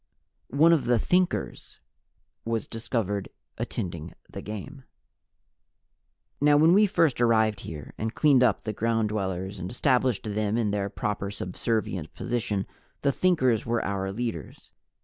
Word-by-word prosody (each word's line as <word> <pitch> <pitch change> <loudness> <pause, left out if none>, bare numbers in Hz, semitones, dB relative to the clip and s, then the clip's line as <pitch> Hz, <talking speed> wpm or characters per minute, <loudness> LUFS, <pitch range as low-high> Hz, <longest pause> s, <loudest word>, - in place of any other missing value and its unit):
One 160 +6 +5
of 160 - +2
the 120 0 +3
Thinkers 180 +9 -1 0.6
was 115 -2 -2
discovered 110 -4 -3 0.3
attending 85 -4 -4
the - - -8
game. 120 +6 -7 1.6
Now, 145 0 +5
when 160 +3 +6
we 210 +2 +6
first 165 - +2
arrived 110 -3 +3
here, 75 -5 -8
and 110 +1 -3
cleaned 145 -4 +5
up 120 -5 +5
on - - -32
the 110 - -3
Ground 115 0 0
Dwellers 95 -1 -3
and 90 +1 -5
established 125 -2 +1
them 105 0 -1
in 110 -3 +1
their 100 -1 -1
proper 100 0 -3
subservient 95 -2 -3
position, 110 -5 -2 0.4
the 140 - +3
Thinkers 130 - +2
were 115 0 -1
our 95 -1 -2
leaders. 110 -6 -5
110 Hz, 140 wpm, -27 LUFS, 100-130 Hz, 1.6 s, when